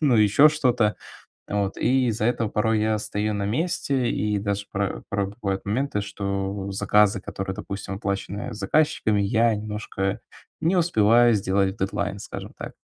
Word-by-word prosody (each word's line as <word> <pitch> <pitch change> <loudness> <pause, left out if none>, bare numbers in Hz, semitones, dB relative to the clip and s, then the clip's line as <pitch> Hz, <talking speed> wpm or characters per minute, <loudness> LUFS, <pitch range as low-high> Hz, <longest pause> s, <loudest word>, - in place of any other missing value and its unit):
ну 140 -7 +3
ещё 110 +8 +6
что-то. 125 -8 +1 0.5
Вот 100 -1 -1
и 130 +1 +2
из-за 110 -1 0
этого 115 -2 0
порой 110 0 +1
я 110 0 +1
стою 105 0 -2
на 100 - -2
месте 135 - 0
и 105 -1 0
даже 100 0 -2
пра 100 -1 -2
правда 100 0 -2
бывают 95 -1 -2
моменты, 120 +1 -1
что 100 -1 -3
заказы, 105 0 +3
которые, 95 0 -5
допустим, 100 -2 -5
оплачены 100 +3 -4
заказчиками, 105 -1 +1
я 115 +3 +3
немножко 105 -2 -3 0.4
не 165 +4 +2
успеваю 120 - +4
сделать 95 -1 +1
в - - -23
дедлайн, 100 +1 -2
скажем - - -8
так. - - -7
105 Hz, 155 wpm, -24 LUFS, 100-115 Hz, 0.5 s, ещё